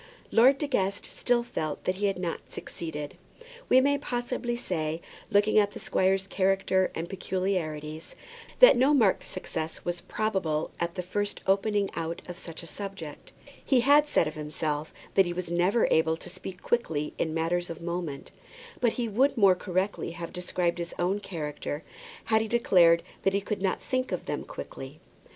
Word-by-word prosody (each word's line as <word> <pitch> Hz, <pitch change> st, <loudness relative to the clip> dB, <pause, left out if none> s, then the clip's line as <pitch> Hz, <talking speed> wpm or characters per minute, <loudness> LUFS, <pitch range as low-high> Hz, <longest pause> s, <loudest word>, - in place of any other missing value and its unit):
Lord 260 Hz, +4 st, +6 dB
De 295 Hz, -, -2 dB
Guest 200 Hz, -8 st, 0 dB
still 240 Hz, -1 st, +1 dB
felt 155 Hz, -10 st, -4 dB
that 185 Hz, 0 st, 0 dB
he 205 Hz, +1 st, +1 dB
had 195 Hz, -, -1 dB
not 175 Hz, -2 st, -4 dB
succeeded. 150 Hz, -3 st, -6 dB, 0.5 s
We 255 Hz, -, +7 dB
may 285 Hz, +1 st, +2 dB
probably 245 Hz, -2 st, -2 dB
say, 165 Hz, -9 st, -2 dB, 0.3 s
looking 205 Hz, +1 st, +4 dB
at 205 Hz, -1 st, +2 dB
the -, -, -7 dB
squire's 190 Hz, +1 st, +1 dB
character 190 Hz, -1 st, +2 dB
and 165 Hz, +1 st, -3 dB
peculiarities, 165 Hz, -5 st, -3 dB, 0.5 s
that -, -, +10 dB
no 265 Hz, +4 st, +4 dB
marked 220 Hz, -8 st, +3 dB
success 160 Hz, -3 st, -5 dB
was 175 Hz, 0 st, -2 dB
probable 185 Hz, -9 st, -1 dB
at 170 Hz, 0 st, -2 dB
the 180 Hz, -, -3 dB
first 205 Hz, +3 st, -2 dB
opening 200 Hz, +1 st, +2 dB
out 165 Hz, 0 st, -4 dB
of 180 Hz, 0 st, -7 dB
such 165 Hz, 0 st, -6 dB
a -, -, -8 dB
subject. 180 Hz, -4 st, -8 dB, 0.3 s
He 260 Hz, -3 st, +3 dB
had 290 Hz, +4 st, +5 dB
said 170 Hz, -, +2 dB
of 155 Hz, -, -4 dB
himself 150 Hz, 0 st, -3 dB, 0.2 s
that 195 Hz, -2 st, +5 dB
he 175 Hz, -, -2 dB
was 175 Hz, -1 st, -4 dB
never 180 Hz, +6 st, +3 dB
able 160 Hz, 0 st, +3 dB
to -, -, -11 dB
speak 185 Hz, 0 st, -9 dB
quickly 160 Hz, -11 st, 0 dB
in 160 Hz, -, 0 dB
matters 165 Hz, +2 st, 0 dB
of 165 Hz, -, -6 dB
moment; 170 Hz, -4 st, -4 dB, 0.5 s
but 235 Hz, -3 st, +2 dB
he 240 Hz, -2 st, -2 dB
would 260 Hz, +6 st, +2 dB
more 200 Hz, -4 st, +7 dB
correctly 185 Hz, +1 st, -2 dB
have 170 Hz, -1 st, -6 dB
described 180 Hz, -1 st, -1 dB
his 170 Hz, 0 st, -5 dB
own 185 Hz, +4 st, +1 dB
character 150 Hz, -5 st, -5 dB, 0.4 s
had 220 Hz, 0 st, +3 dB
he 220 Hz, -, -2 dB
declared 175 Hz, -7 st, +5 dB, 0.2 s
that 195 Hz, -, +2 dB
he 200 Hz, -, +2 dB
could 205 Hz, 0 st, -3 dB
not 190 Hz, -1 st, 0 dB
think 255 Hz, 0 st, -1 dB
of -, -, -3 dB
them -, -, -3 dB
quickly. -, -, -8 dB
185 Hz, 175 wpm, -28 LUFS, 165-210 Hz, 0.5 s, that